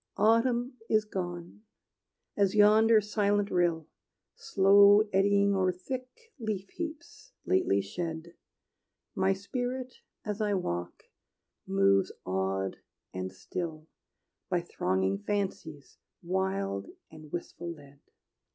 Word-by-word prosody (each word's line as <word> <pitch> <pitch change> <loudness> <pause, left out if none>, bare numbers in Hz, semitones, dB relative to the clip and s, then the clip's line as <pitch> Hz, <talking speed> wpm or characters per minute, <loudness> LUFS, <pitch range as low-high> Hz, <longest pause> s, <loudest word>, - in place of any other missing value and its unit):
Autumn 240 +4 +2
is 215 -1 +3
gone: 175 -2 -6 0.7
as 200 -1 +2
yonder 215 +2 +6
silent 205 -1 0
rill, 170 -3 +1 0.5
Slow 200 +1 +6
eddying 200 +1 +3
o'er 185 -1 +2
thick 255 - -8
leaf 205 -4 -4
heaps 325 -3 -8
lately 95 +1 +2
shed, 165 - -5 0.8
My 190 +1 +2
spirit, 250 +5 -4 0.3
as 210 0 -3
I 205 -1 +1
walk, 85 - -4 0.6
moves 95 0 +3
awed 95 +1 -1 0.4
and 95 0 -4
still, 155 - -6 0.6
By 180 -2 +1
thronging 95 - -1
fancies 160 - -4 0.2
wild 170 - -2 0.2
and 155 -1 -13
wistful 175 0 -5
led. 140 -3 -14
190 Hz, 100 wpm, -29 LUFS, 150-210 Hz, 0.8 s, yonder